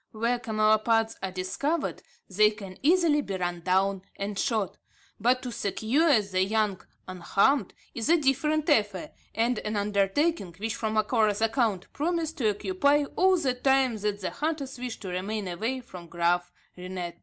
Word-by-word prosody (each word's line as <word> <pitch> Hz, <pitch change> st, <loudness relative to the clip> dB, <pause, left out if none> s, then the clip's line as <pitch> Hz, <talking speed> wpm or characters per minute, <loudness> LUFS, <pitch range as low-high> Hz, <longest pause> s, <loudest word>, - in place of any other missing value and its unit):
Where 235 Hz, +3 st, 0 dB
camelopards 220 Hz, 0 st, +2 dB
are 190 Hz, -, -2 dB
discovered 190 Hz, -, -2 dB, 0.3 s
they 210 Hz, +3 st, +4 dB
can 200 Hz, -3 st, -9 dB
easily 320 Hz, -1 st, +4 dB
be 195 Hz, -8 st, -4 dB
run 175 Hz, -1 st, -2 dB
down 190 Hz, +2 st, +1 dB
and 200 Hz, 0 st, -4 dB
shot; 220 Hz, -7 st, -1 dB, 0.4 s
but 250 Hz, +4 st, +2 dB
to 250 Hz, -, -4 dB
secure 240 Hz, -, +2 dB
the 185 Hz, -2 st, 0 dB
young 210 Hz, -1 st, 0 dB, 0.3 s
unharmed, 195 Hz, +9 st, +1 dB, 0.2 s
is 230 Hz, +4 st, -3 dB
a 340 Hz, -, +6 dB
different 300 Hz, +2 st, +1 dB
affair, 205 Hz, -, +1 dB, 0.2 s
and 235 Hz, 0 st, +1 dB
an 215 Hz, 0 st, -4 dB
undertaking, 205 Hz, -, 0 dB
which, 220 Hz, +3 st, -3 dB
from 220 Hz, -2 st, -2 dB
Macora's 215 Hz, -1 st, +2 dB
account, 225 Hz, -4 st, 0 dB
promised 325 Hz, 0 st, -2 dB
to 225 Hz, -4 st, +3 dB
occupy 290 Hz, -, +2 dB
all 375 Hz, 0 st, +4 dB
the 270 Hz, -7 st, 0 dB
time 265 Hz, -1 st, +2 dB
that 205 Hz, -1 st, -2 dB
the -, -, -3 dB
hunters 290 Hz, -4 st, -3 dB
wished 245 Hz, -3 st, -6 dB
to 190 Hz, -, -5 dB
remain 195 Hz, +3 st, -3 dB
away 225 Hz, +9 st, -3 dB
from 180 Hz, -8 st, -11 dB
Graaf 175 Hz, +1 st, 0 dB, 0.2 s
Reinet. 180 Hz, -1 st, -6 dB
220 Hz, 155 wpm, -27 LUFS, 195-270 Hz, 0.4 s, a